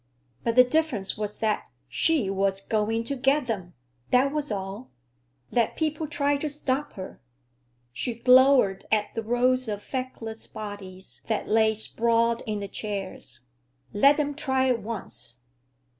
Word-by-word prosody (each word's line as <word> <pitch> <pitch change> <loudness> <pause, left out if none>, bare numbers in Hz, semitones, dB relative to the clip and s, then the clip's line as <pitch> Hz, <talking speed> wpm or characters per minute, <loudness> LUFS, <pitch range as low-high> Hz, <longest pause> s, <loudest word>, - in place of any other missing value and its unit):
But 230 - 0
the 250 - +9
difference 250 -7 0
was 210 -1 -4
that 215 -2 0 0.2
she 310 -10 +2
was 195 0 +1
going 220 +3 0
to 280 +4 -3
get 270 +2 +2
them! 190 -7 -4 0.3
That 260 +2 +4
was 295 -1 -2
all. 200 +4 -5 0.6
Let 235 -2 +1
people 310 0 -1
try 285 -2 +1
to 300 +2 -2
stop 290 0 -2
her! 185 -7 -9 0.7
She 235 - -2
glowered 250 -4 +5
at 210 -1 +1
the 225 - -2
rows 250 +2 +2
of 205 -1 -4
feckless 245 -4 -5
bodies 200 -3 -8
that 220 - -1
lay 220 0 +3
sprawled 230 +1 +2
in 210 -1 -2
the 200 - -4
chairs. 195 - -5 0.5
Let 275 +8 +5
them 290 -1 0
try 265 -3 +1
it 240 -3 +1
once! 195 - -6
230 Hz, 145 wpm, -26 LUFS, 205-270 Hz, 0.7 s, the